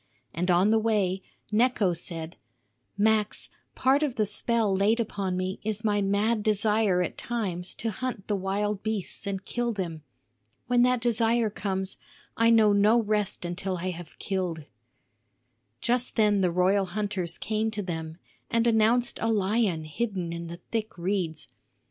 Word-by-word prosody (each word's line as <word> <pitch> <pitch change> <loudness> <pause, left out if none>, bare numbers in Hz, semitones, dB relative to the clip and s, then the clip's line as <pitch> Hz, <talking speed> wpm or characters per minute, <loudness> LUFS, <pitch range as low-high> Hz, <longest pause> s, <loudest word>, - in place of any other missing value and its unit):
And 180 +3 -1
on 180 +4 +4
the 225 - +4
way 205 -4 +1 0.3
Necho 215 -4 +3
said: 165 -1 -5 0.6
"Max, 215 0 +2 0.3
part 265 +3 +3
of 285 -5 0
the 215 - +1
spell 210 0 0
laid 210 +4 +2
upon 195 -5 -2
me 185 +1 -3
is 215 +1 -2
my 205 -1 +2
mad 205 +3 +1
desire 210 -3 +3
at - - -5
times 190 -7 -2
to 225 0 -2
hunt 240 -1 -4
the 210 - 0
wild 200 +1 -1
beasts 215 -3 -2
and 195 -1 -3
kill 240 -1 -1
them. 175 -7 -4 0.6
When 245 0 +3
that 250 -1 +3
desire 230 -1 +2
comes, 190 -2 -3 0.4
I 230 0 +4
know 220 -3 +5
no 210 +4 +5
rest 210 -4 -1
until 180 +2 -3
I 185 +2 -2
have 175 -2 -10
killed." 180 -5 -3 1.2
Just 245 +1 +1
then 210 -3 +3
the 180 - +3
royal 190 +3 +2
hunters 190 -2 -2
came 215 +1 -1
to 210 -2 -4
them 160 -3 -5 0.3
and 230 0 +2
announced 235 +2 +3
a 225 - +1
lion 200 -4 +1
hidden 180 +1 -3
in 170 0 -5
the 170 +1 -7
thick 220 -3 -3
reeds. 175 -2 -2
205 Hz, 155 wpm, -27 LUFS, 185-225 Hz, 1.2 s, know